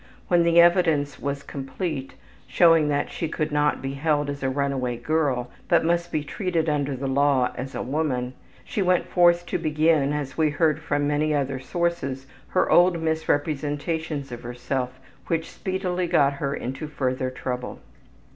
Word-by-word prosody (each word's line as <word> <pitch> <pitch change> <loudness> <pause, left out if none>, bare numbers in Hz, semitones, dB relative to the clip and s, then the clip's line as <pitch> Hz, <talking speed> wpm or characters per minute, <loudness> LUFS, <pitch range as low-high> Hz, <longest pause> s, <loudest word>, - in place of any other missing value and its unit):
When 175 -1 +4
the 170 0 +4
evidence 165 -5 +3
was 140 0 -3
complete, 140 +1 -5 0.3
showing 165 -3 +5
that 145 -1 0
she 165 - -3
could 155 -1 -2
not 150 -2 +1
be 135 0 -3
held 145 0 0
as 140 - -7
a 135 - 0
runaway 130 -3 -1
girl, 130 -3 0 0.2
but - - +3
must 170 +1 0
be 150 - -1
treated 165 +1 -2
under 145 -2 0
the 135 +2 -5
law 135 -1 +2
as 130 +2 -6
a - - -2
woman, 130 -3 -1 0.3
she 205 - -3
went 180 -1 +2
forth 175 -1 +4
to 175 - -2
begin, 155 -2 +2
as 145 -1 -4
we 155 -1 +4
heard 150 +1 +1
from 145 -2 -1
many 150 +1 +1
other 135 -2 -1
sources, 135 -3 -2 0.2
her - - +1
old 175 -1 +5
misrepresentations 155 -1 -1
of 120 - -7
herself, 125 +1 -4 0.3
which 165 +2 -1
speedily 185 -2 -2
got 140 -4 +3
her 140 0 -2
into 135 +5 -5
further 130 -3 -2
trouble. 125 -1 -5
145 Hz, 165 wpm, -24 LUFS, 135-165 Hz, 0.3 s, showing